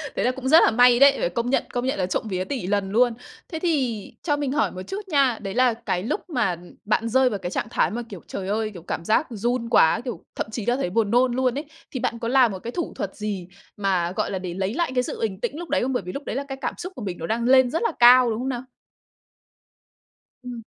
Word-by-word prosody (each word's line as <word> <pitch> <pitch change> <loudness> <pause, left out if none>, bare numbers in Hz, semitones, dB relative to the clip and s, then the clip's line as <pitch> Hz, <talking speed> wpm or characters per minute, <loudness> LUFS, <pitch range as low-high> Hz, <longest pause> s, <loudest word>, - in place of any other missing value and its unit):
thế - - 0
là 250 - +3
cũng 260 0 -6
rất 315 +5 +8
là - - +4
may 245 +1 +5
đấy, 275 0 +7
phải - - 0
công 235 +7 -2
nhận, 270 - +2
công 245 0 -1
nhận 265 - -1
là 180 - +1
trộm 190 +4 -2
vía 185 -2 -2
tỉ 230 -4 -4
lần 200 -1 0
luôn. 240 +2 +3 0.4
Thế 320 - -4
thì 265 - -1
cho 295 -3 +1
mình 285 -2 -2
hỏi 295 +3 +1
một 185 - -7
chút 400 +1 -6
nha, 275 -8 +2
đấy 195 -2 -5
là 250 0 +3
cái 220 -6 -3
lúc 305 - -3
mà, 245 - +1
ừm, 175 0 -9
bạn 220 +2 +1
rơi 260 +2 +4
vào 205 -4 -3
cái 175 - -5
trạng - - -2
thái - - +1
mà, 235 - -3
kiểu, 195 -5 -9
trời 190 -1 -5
ơi, 215 +1 -1
kiểu, 175 - -9
cảm 170 0 -5
giác 220 +8 +2
run 235 +1 -2
quá, 160 -7 +4
kiểu, 225 -9 -5
thậm - - -3
chí 220 -2 -4
là 240 +1 +2
thấy 220 -10 -2
buồn 210 +1 0
nôn 245 0 +3
luôn 255 0 +1
ấy, 295 - -4 0.3
thì 260 - -4
bạn 230 - -2
có 230 - -3
làm 255 -2 +4
một 190 - -6
cái 230 - -6
thủ 345 +4 -4
thuật 195 - -4
gì 200 -4 -4 0.3
mà, 185 -4 0
gọi - - -2
là, 190 - -2
để 180 -2 -5
lấy 190 +3 -2
lại 335 -2 -1
cái 250 - +2
sự - - -5
bình 205 -4 -2
tĩnh 245 +5 -2
lúc 345 - -7
đấy - - +1
không? 265 +2 -1
Bởi 245 - -1
vì 180 - -6
lúc 280 +1 -7
đấy - - -4
là 275 - -2
cái 270 - -6
cảm - - -2
xúc 365 +2 -7
của - - -8
mình 185 -4 -4
nó 165 - -5
đang 230 +2 -1
lên 260 0 +5
rất 320 - -1
là 460 - +1
cao, 245 0 +8
đúng 220 0 -2
không 260 - -2
nào? 245 -1 -3 1.8
Ừm. 245 -2 -7
240 Hz, 285 wpm, -24 LUFS, 200-260 Hz, 1.8 s, rất